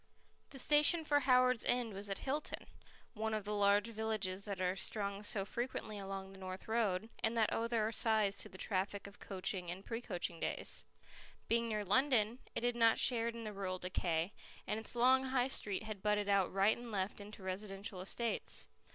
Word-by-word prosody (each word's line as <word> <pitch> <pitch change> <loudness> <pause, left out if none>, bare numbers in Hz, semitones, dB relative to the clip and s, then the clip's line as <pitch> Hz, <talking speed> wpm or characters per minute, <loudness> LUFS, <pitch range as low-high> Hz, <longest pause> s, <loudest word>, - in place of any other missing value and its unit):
The 275 - -9
station 300 +4 +5
for 290 -1 +4
Howards 255 -3 +4
End 245 -3 0
was 200 +1 -5
at 195 - -2
Hilton, 290 +3 -3 0.5
one 220 -1 -2
of 215 - -3
the 210 - -2
large 205 0 +4
villages 215 -4 -2
that 200 -3 -4
are 185 0 0
strung 200 0 -2
so 205 -1 +1
frequently 220 -2 -4
along 195 0 -6
the 195 - -13
North 185 0 -7
Road, 220 -3 0 0.2
and 230 +1 +1
that 220 -2 +2
owe 230 - 0
their 225 -2 0
size 215 -3 +3
to - - -5
the 185 - -11
traffic 195 +1 -2
of 200 0 -11
coaching 185 -2 -2
and 185 +3 -6
pre 230 0 -4
coaching 180 -7 -3
days. - - -2 0.6
Being 235 0 +2
near 210 -1 -2
London, 240 +1 +2 0.2
it - - -2
had 245 0 +1
not 230 -1 +4
shared 235 -2 +5
in 230 - -6
the 215 -1 -5
rural 190 -2 -3
decay, 180 0 -1 0.3
and 215 - -2
its 220 - -3
long 260 +2 +4
High 260 -1 +1
Street 205 -6 -1
had 215 -3 -6
budded 210 0 +1
out 200 -2 +3
right 195 +3 +3
and 240 -1 -8
left 195 0 -2
into 205 -1 -10
residential 195 0 -4
estates. 230 +4 0
210 Hz, 195 wpm, -36 LUFS, 195-235 Hz, 0.6 s, station